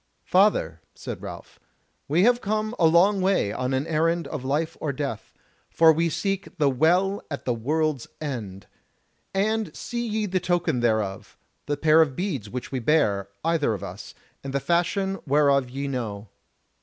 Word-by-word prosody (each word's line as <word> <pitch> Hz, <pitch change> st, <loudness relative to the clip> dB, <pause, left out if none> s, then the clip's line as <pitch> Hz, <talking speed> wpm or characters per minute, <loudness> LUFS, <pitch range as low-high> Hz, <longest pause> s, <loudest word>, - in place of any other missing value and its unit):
"Father," 200 Hz, +3 st, +2 dB
said -, -, -7 dB
Ralph, -, -, -9 dB, 0.5 s
"we 165 Hz, +6 st, +3 dB
have 245 Hz, +2 st, +4 dB
come 215 Hz, +2 st, -1 dB
a 165 Hz, -, +6 dB
long 185 Hz, +5 st, +4 dB
way 185 Hz, -, +1 dB
on 125 Hz, +2 st, -2 dB
an 135 Hz, +2 st, 0 dB
errand 165 Hz, +1 st, 0 dB
of 150 Hz, -5 st, -5 dB
life 150 Hz, +5 st, -1 dB
or 150 Hz, -, -1 dB
death; 135 Hz, -5 st, -5 dB, 0.4 s
for 165 Hz, -1 st, +5 dB
we 165 Hz, +2 st, +1 dB
seek 195 Hz, +3 st, -3 dB
the 145 Hz, -3 st, +3 dB
WELL 180 Hz, +9 st, +2 dB
at 140 Hz, -, -6 dB
the 125 Hz, -, +1 dB
WORLD'S 150 Hz, +3 st, -1 dB
END. 110 Hz, -10 st, -5 dB, 0.7 s
And 215 Hz, +3 st, -1 dB
see 240 Hz, 0 st, -4 dB
ye 215 Hz, -1 st, -1 dB
the 185 Hz, -2 st, 0 dB
token 175 Hz, -6 st, 0 dB
thereof, 110 Hz, -5 st, -1 dB, 0.3 s
the 145 Hz, 0 st, -1 dB
pair 160 Hz, 0 st, +5 dB
of 145 Hz, -5 st, +1 dB
beads 175 Hz, -, -3 dB
which 125 Hz, 0 st, -6 dB
we 130 Hz, -, -2 dB
bear, 110 Hz, -8 st, +1 dB, 0.2 s
either 160 Hz, -9 st, +1 dB
of 100 Hz, -, -8 dB
us, 100 Hz, +1 st, -8 dB, 0.3 s
and 135 Hz, -1 st, -6 dB
the 140 Hz, -, +1 dB
fashion 190 Hz, +5 st, 0 dB
whereof 140 Hz, -2 st, +3 dB
ye 140 Hz, +3 st, -4 dB
know." 110 Hz, -6 st, -4 dB
155 Hz, 170 wpm, -25 LUFS, 130-185 Hz, 0.7 s, a